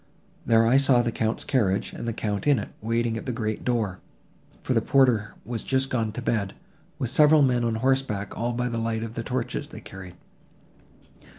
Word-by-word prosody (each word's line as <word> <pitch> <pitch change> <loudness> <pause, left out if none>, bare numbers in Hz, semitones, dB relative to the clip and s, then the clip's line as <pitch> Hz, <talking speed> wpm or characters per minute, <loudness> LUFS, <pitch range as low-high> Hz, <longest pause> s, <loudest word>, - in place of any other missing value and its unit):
There 115 -1 +5
I 120 +4 +5
saw 135 -3 +4
the 120 - -1
Count's 110 0 -1
carriage, 105 -6 0
and - - -6
the - - 0
Count 105 +1 -3
in 145 -2 +5
it, 105 - -4
waiting 115 +1 0
at 115 - -7
the - - 0
great 110 -2 -3
door,—for 110 - -4
the 115 - +2
porter 125 -5 +2
was 115 -2 -4
just 135 0 -1
gone 115 -3 0
to 125 - -6
bed—with 150 - -4
several 150 +1 +6
men 125 -2 +2
on 115 -1 0
horseback 115 -4 0
all 120 +1 -2
by 125 +1 -1
the 115 -1 -2
light 115 0 -2
of 115 -1 -6
the 115 - -4
torches 125 +1 -3
they - - -9
carried." 95 -2 -11
115 Hz, 190 wpm, -25 LUFS, 110-130 Hz, -, several